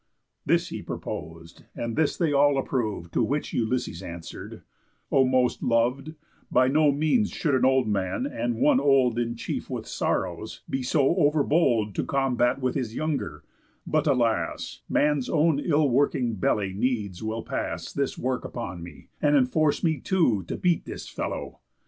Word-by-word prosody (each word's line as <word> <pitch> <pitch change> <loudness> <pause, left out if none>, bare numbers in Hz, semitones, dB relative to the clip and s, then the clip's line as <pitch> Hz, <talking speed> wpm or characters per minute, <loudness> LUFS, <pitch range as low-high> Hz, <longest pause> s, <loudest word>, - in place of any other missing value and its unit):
This - - +2
he - - -5
propos'd; 80 +2 -7
and 115 -1 -3
this 155 -1 +1
they 165 -4 +1
all 140 0 +4
approv'd, 110 -10 -2
To - - +2
which 145 +3 -1
Ulysses 115 -6 -1
answer'd: 85 -2 -8 0.5
"O 135 - +5
most 130 -1 +1
lov'd, 125 +6 0 0.4
By 130 0 +4
no 150 +1 +4
means 155 - +2
should 150 -6 -1
an 130 - +3
old 130 -2 +3
man, 100 - -1
and 120 - -2
one 125 +3 +4
old 135 -4 +3
In 120 0 -1
chief 115 - -5
with - - -4
sorrows, - - -2
be 135 - -2
so 135 +4 +2
over 150 -3 +3
bold 120 - +2
To - - -1
combat 130 -2 +1
with 130 -1 0
his 120 -4 -3
younger; 155 -1 -3 0.4
but, 155 -1 0
alas, 115 - 0
Man's 145 -3 +1
own 155 -2 +3
ill 150 -1 +2
working 130 -2 +1
belly 100 -1 0
needs 105 -4 -2
will 110 +1 -3
pass - - -4
This 140 -1 -2
work 130 0 -2
upon 95 -8 -6
me, 85 -3 -12
and 145 0 +3
enforce 145 +3 +2
me, 160 -4 +1
too, 140 - +2
To - - -4
beat 175 -3 +1
this - - -7
fellow. - - -5
130 Hz, 165 wpm, -26 LUFS, 115-145 Hz, 0.5 s, O